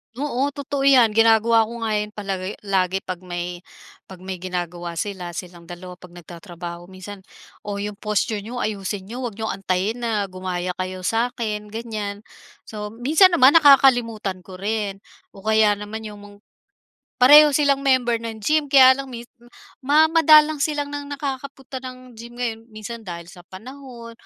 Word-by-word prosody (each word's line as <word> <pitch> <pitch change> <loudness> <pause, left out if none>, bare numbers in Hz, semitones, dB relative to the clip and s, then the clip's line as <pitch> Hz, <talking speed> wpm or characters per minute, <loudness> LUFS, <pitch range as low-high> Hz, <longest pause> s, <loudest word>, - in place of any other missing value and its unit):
Oo, 275 0 -1
totoo 280 -1 -2
'yan 245 -5 +6
ginagawa 225 0 +4
ko 235 0 -7
nga 220 - -1
yan 210 0 -5
palagi 195 -1 -4
lagi 190 -1 0
'pag 185 -1 -5
may 175 -1 -6 0.5
'pag 185 -1 -13
may 185 -1 -6
ginagawa 175 -1 -5
sila, 180 -2 -5
silang 175 -2 -9
dalawa 180 +1 -10
'pag 180 -1 -15
nagtatrabaho 175 0 -10
minsan, 190 +2 -10 0.5
"Oh 205 - -3
'yong 205 +1 -5
posture 210 0 -1
niyo 220 +5 -8
ayusin 200 -2 -4
niyo 230 +6 -8
huwag 240 -5 -5
niyong 220 0 -3
antayin 195 +4 -2
na 225 -4 -1
gumaya 185 -1 -4
kayo 185 0 -5
sa'kin." 225 -1 -2
Ganyan. 215 -2 -6 0.4
So, 210 -1 -7
minsan 305 - +3
naman 275 +5 +7
nakakalimutan 245 - +4
ko 190 - -10
rin 200 0 -3 0.3
o 195 - -13
kaya 215 -1 +3
naman 210 +2 -7
'yong 210 -1 -10
meng 205 0 -14 0.8
pareho 295 +4 +8
silang 280 -1 +2
member 255 -4 +1
ng 225 -2 -7
gym 305 +1 +1
kaya 265 -2 +8
lang 270 +1 -5
mis 240 -2 -8 0.2
hmm 240 - -19 0.3
ma 295 +3 +4
madalang 310 -2 +5
silang 290 -1 -2
nang 285 0 -6
nakakapunta 275 -1 -6
ng 255 -1 -10
gym 235 +1 -12
ngayon. 230 -2 -4
Minsan 220 +1 -8
dahil 175 -5 -8
sa 180 0 -14
panahon 235 +5 -11
220 Hz, 165 wpm, -22 LUFS, 190-255 Hz, 0.8 s, pareho